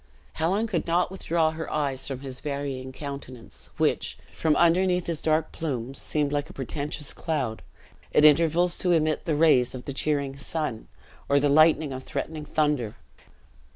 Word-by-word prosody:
Helen 190 +7 +1
could 190 -8 -2
not 175 +2 +2
withdraw 165 -4 +1
her 160 0 -6
eyes 140 -3 -1
from 135 -2 -5
his 130 -2 -6
varying 140 -3 -4
countenance, 130 -5 -8
which, - - 0 0.2
from 155 -2 +1
underneath 180 +2 +3
his 165 -3 -2
dark 155 0 +1
plumes, 135 -4 -3
seemed 150 -2 0
like 145 0 -1
a - - -11
portentous 145 +2 -4
cloud, 135 -9 -2 0.5
at 150 - +5
intervals 165 +3 +5
to 180 -1 +2
emit 155 -2 +1
the 160 - +1
rays 135 -5 +4
of 125 - -8
the 140 - -4
cheering 140 -1 0
sun, 145 -6 -3 0.4
or 140 - +5
the 145 +1 +2
lightning 155 0 +5
of 130 0 -6
threatening 155 +2 -4
thunder. 145 -8 0
150 Hz, 160 wpm, -26 LUFS, 135-160 Hz, 0.5 s, at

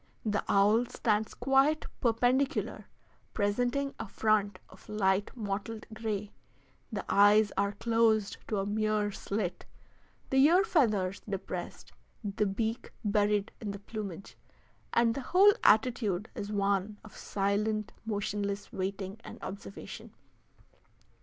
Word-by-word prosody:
The 205 -1 0
owl 210 +5 +4
stands 220 -3 0
quite 270 +4 +3
perpendicular, 250 +3 +1 0.5
presenting 245 +7 0
a - - -4
front 205 -1 +1
of 190 - -18
light 200 -1 +1
mottled 215 +1 -4
gray; 215 -2 -3 0.6
the 205 -3 -4
eyes 205 +1 +5
are 200 +1 +1
closed 220 -1 +2
to 215 - -1
a 195 - 0
mere 210 0 0
slit, 195 -2 -3 0.7
the 265 - +2
ear 350 +6 +6
feathers 210 - +1
depressed, 185 -2 -5 0.3
the 205 0 0
beak 220 +4 -2
buried 205 0 +2
in 215 - -4
the 200 0 -5
plumage, 200 -3 -7 0.6
and 235 -1 +3
the 275 - -4
whole 385 +10 +6
attitude 215 -3 +3
is 205 +1 -5
one 200 0 0
of 215 - -14
silent, 210 +2 -1
motionless 205 -1 -3
waiting 195 +1 -4
and - - -9
observation. 195 +1 -8
210 Hz, 120 wpm, -30 LUFS, 200-225 Hz, 0.7 s, ear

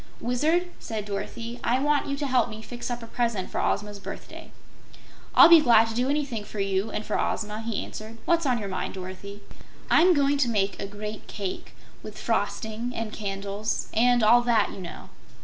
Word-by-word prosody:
"Wizard," 315 +9 +1
said 215 -2 -5
Dorothy, 230 +4 -5
"I 245 - +2
want 295 +1 +1
you 280 0 -2
to 290 - -2
help 255 -2 +2
me 220 0 -8
fix 240 +2 -6
up 240 -1 -4
a - - -6
present 230 -5 -2
for - - -1
Ozma's 205 -1 -1
birthday." - - -9 0.8
"I'll - - +10
be 335 -2 +9
glad 230 -4 +5
to - - -4
do 250 +3 0
anything 280 -7 -1
for 205 - -8
you 195 +2 0
and 210 0 -4
for 210 - -1
Ozma," 210 0 -2
he 225 -2 -3
answered. 220 +1 -9
"What's 335 -3 +2
on 250 -2 +2
your 210 -3 -4
mind, 190 0 -4
Dorothy?" 190 +2 -8 0.5
"I'm 355 +2 +6
going 285 0 +2
to 255 -4 +2
make 200 -3 0
a 200 - -3
great 210 +1 -7
cake, 195 -3 -6 0.3
with - - -9
frosting 225 +2 -2
and 225 -1 -4
candles, 200 +1 -3
and 240 +1 +4
all 235 +3 +6
that, 235 -3 +2
you - - -9
know." 175 -2 -9
225 Hz, 195 wpm, -26 LUFS, 205-245 Hz, 0.8 s, I'll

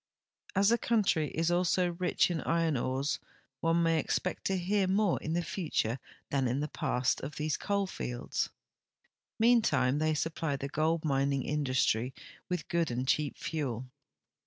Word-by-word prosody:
As 200 +2 +5
the 235 +1 +3
country 200 -9 +2
is 165 +1 0
also 180 0 +2
rich 180 +1 +1
in 165 - -1
iron 165 -2 +1
ores, 130 +3 -1 0.4
one 165 +1 +2
ma}'' 165 -1 +3
expect - - -2
to 195 - +1
hear 190 +2 +1
more 195 0 +2
in 155 - -3
the 175 +1 0
future 155 - -1 0.3
than 135 -2 +2
in 125 +3 0
the 150 0 -3
])ast 125 +1 +1
of 145 +2 -6
these 155 0 -1
coal 200 -1 0
fields. 125 -9 -3 0.9
Meantime 225 - +3
thei' 155 0 +2
supply 160 -1 -1
the 140 0 -4
gold 160 +2 0
mining 140 -1 +1
industiy 130 -4 +1 0.4
with 180 -3 -2
good 170 -2 +1
and 125 +2 -2
cheap 145 +1 +1
fuel. 130 -6 -3
155 Hz, 160 wpm, -31 LUFS, 135-175 Hz, 0.9 s, As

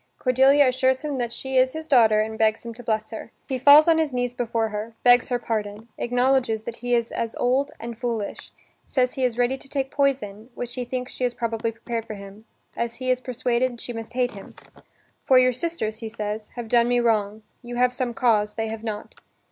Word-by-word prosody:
Cordelia 265 +2 +4
assures 260 +2 +1
him 295 -3 -3
that 240 -1 -2
she 265 +2 -3
is 260 +1 +4
his 315 0 -6
daughter, 225 -7 +5
and 220 +1 -3
begs 220 +1 +1
him 230 - -6
to 240 - -11
bless 220 -1 -2
her. 220 - -7 0.2
He 260 -1 -2
falls 290 +4 +8
on 325 -1 +5
his 315 -3 0
knees 245 -1 -1
before 230 -2 -1
her, 215 +2 -5
begs 245 0 +5
her 245 - +1
pardon, 215 -1 -4
acknowledges 245 -2 +1
that 235 +1 -6
he 245 0 0
is 235 -1 -1
as 230 -1 -3
old 265 +3 +1
and 235 0 -7
foolish, 230 -4 -4 0.4
says 255 -2 +1
he 265 - -3
is 245 -2 0
ready 245 +2 +1
to 275 - -13
take 270 -2 -2
poison, 240 -6 -1
which 245 0 -5
he 250 -1 -4
thinks 250 +1 -4
she - - -5
has 245 -1 0
probably 230 -1 -2
prepared 230 0 -5
for 215 - -6
him, 200 +2 -12 0.3
as 235 0 -3
he 255 0 -1
is 255 0 0
persuaded 250 -1 -1
she 245 - -6
must 225 0 -7
hate 250 0 0
him. 200 - -12 0.7
("For 260 - +5
your 255 0 +5
sisters," 250 -6 -3
he 225 -2 -5
says, 215 -1 -4
"have 240 -2 -5
done 235 +1 +3
me 245 0 +2
wrong: 215 -2 0 0.2
you 240 -1 -7
have 250 0 +2
some 245 -2 -3
cause, 210 -4 +2
they 225 -1 -2
have 220 0 -6
not.") 215 -2 -5
240 Hz, 220 wpm, -24 LUFS, 225-255 Hz, 0.7 s, falls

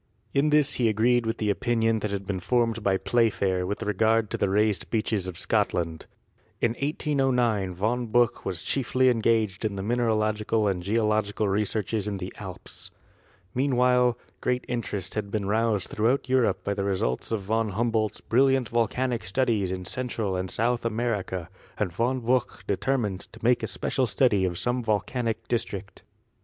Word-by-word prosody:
In 140 +2 +3
this 150 -1 +3
he 115 - +4
agreed 115 +2 +2
with 115 - -1
the 105 -2 +1
opinion 115 0 +1
that 105 - -2
had 100 -1 -4
been 95 -1 -2
formed 115 +2 +1
by 100 -2 +2
Playfair 95 -6 +1
with 100 - -3
regard 110 +1 +2
to - - -1
the 100 - +2
raised 105 0 +1
beaches 110 -4 -1
of 90 -3 -6
Scotland. 80 -2 -1 0.5
In 120 - +2
1809 125 - 0
Von 115 +6 -1
Buch 120 +1 +2
was - - -4
chiefly 130 -1 +2
engaged 110 -4 +1
in 105 -2 -1
mineralogical 110 0 +1
and 95 -3 0
geological 105 +1 +1
researches 105 +1 -1
in 100 -1 -2
the 95 0 -6
Alps. - - -8 0.6
Meanwhile 125 -2 +3 0.2
great 125 0 -1
interest 105 -6 -3
had 105 -2 -3
been 100 -1 -2
roused 105 -2 +1
throughout 120 +6 +1
Europe 125 -7 +2
by 100 - -1
the 100 -1 -2
results 95 - -1
of 110 -3 0
Von 110 +3 0
Humboldt's 110 0 -1
brilliant 130 0 +2
volcanic 120 +1 0
studies 105 0 0
in 90 -1 -4
Central 115 -4 -3
and 90 0 -2
South 120 +4 0
America, 110 -6 -2 0.3
and 95 -5 -1
Von 125 +6 0
Buch 125 +2 0
determined 105 -2 0
to 115 - -13
make 120 +1 +3
a - - -2
spe - - -5
cial 130 -2 +1
study 105 -4 +3
of 90 -2 -2
some 125 +6 0
volcanic 115 +1 -1
district. 100 -4 -3
110 Hz, 165 wpm, -26 LUFS, 100-120 Hz, 0.6 s, he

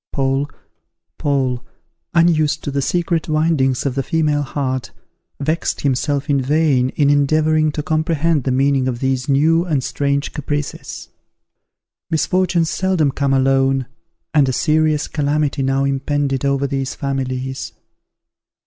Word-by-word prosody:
Paul, 135 +1 0 1.7
unused 165 -3 +3
to 145 - -3
the 140 0 -1
secret 170 +2 -1
windings 155 -5 +1
of 135 - 0
the 135 - -1
female 150 0 0
heart, 130 -3 -3 0.5
vexed 155 +4 -1
himself 140 +1 0
in 140 -3 +2
vain 140 -2 +2
in 145 -1 +3
endeavouring 155 +2 +2
to 150 - -3
comprehend 155 -1 +1
the 130 - 0
meaning 135 0 +2
of 120 -2 -2
these 130 0 -1
new 160 +5 +3
and 150 -7 -1
strange 140 +1 -1
caprices. 145 0 -5 1.0
Misfortunes 170 +1 +1
seldom 185 -7 +1
come 140 +1 -1
alone, 135 0 +2 0.5
and 145 -4 +4
a - - -1
serious 155 +3 +1
calamity 145 -1 0
now 135 +1 +1
impended 140 0 -1
over 140 0 +1
these 135 -1 -2
families. 130 -1 -3
140 Hz, 125 wpm, -19 LUFS, 135-155 Hz, 1.7 s, and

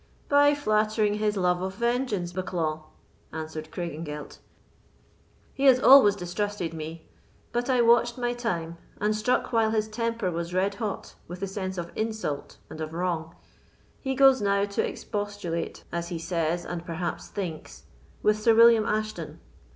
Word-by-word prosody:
"By 290 0 +5
flattering 215 -4 +1
his 210 -1 0
love 180 -1 +1
of 190 +1 -3
vengeance, 235 -7 -1
Bucklaw," 165 -4 -2 0.5
answered 155 0 -6
Craigengelt. 155 -4 -6 1.1
"He 275 - -1
has 260 -2 +7
always 260 -6 +8
distrusted 180 -1 -3
me; 160 +1 -7 0.4
but 240 +2 -1
I 250 -2 +4
watched 235 +1 +4
my 240 -1 -1
time, 170 -9 -3 0.2
and 210 +1 +1
struck 245 +3 0
while 225 -1 +3
his 215 -1 0
temper 230 -3 -2
was 170 +1 -4
red 195 +2 +1
hot 210 -1 -5
with 175 +1 -8
the 195 - -2
sense 190 -1 -4
of 170 -1 -5
insult 220 -10 -3
and 160 - -9
of 155 0 -5
wrong. 170 -2 -2 0.6
He 265 0 -2
goes 270 -2 +6
now 200 0 +2
to 200 0 -1
expostulate, 205 -6 -4
as 170 0 -3
he 170 -1 -4
says, 165 0 -1
and 175 -1 -5
perhaps 170 0 -4
thinks, 175 -6 -6 0.4
with 210 0 +3
Sir 225 +1 +4
William 230 -1 +6
Ashton. 215 0 -3
200 Hz, 150 wpm, -27 LUFS, 170-225 Hz, 1.1 s, always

